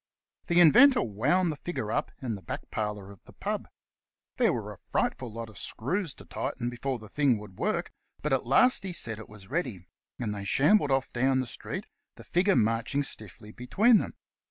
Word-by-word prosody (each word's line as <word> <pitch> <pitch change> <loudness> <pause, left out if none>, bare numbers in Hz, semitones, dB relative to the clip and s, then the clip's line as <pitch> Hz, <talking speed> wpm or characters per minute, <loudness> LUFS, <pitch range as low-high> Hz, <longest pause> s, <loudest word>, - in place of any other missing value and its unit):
The 175 -1 +4
Inventor 245 - +7
wound 145 - +1
the 150 - -6
figure 115 -12 -4
up - - 0
in 120 -3 -1
the 100 - -6
back 85 - -7
parlour 105 -2 -3
of 100 - -16
the - - -15
pub. - - -3 0.7
There - - +4
were - - -4
a - - -17
frightful 125 -3 -2
lot 115 +1 -6
of 110 -3 -10
screws 165 - -2
to - - -13
tighten 120 -1 -3
before 130 +2 -3
the 110 -1 -12
thing 140 -1 +2
would 105 -3 -12
work, - - -1 0.3
but 150 -2 +1
at 130 -2 0
last 250 - +5
he 190 -2 -4
said 110 -9 -1
it 110 - -10
was 105 0 -14
ready, 125 - -2 0.3
and 110 -4 -2
they 100 -1 -5
shambled 150 - +4
off 135 -1 0
down 130 +2 +2
the 130 - 0
street, 120 - -6 0.3
the - - -12
figure 185 +3 +2
marching 115 +5 +1
stiffly 105 -3 -9
between 210 - +4
them. - - -5
125 Hz, 200 wpm, -28 LUFS, 110-160 Hz, 0.7 s, Inventor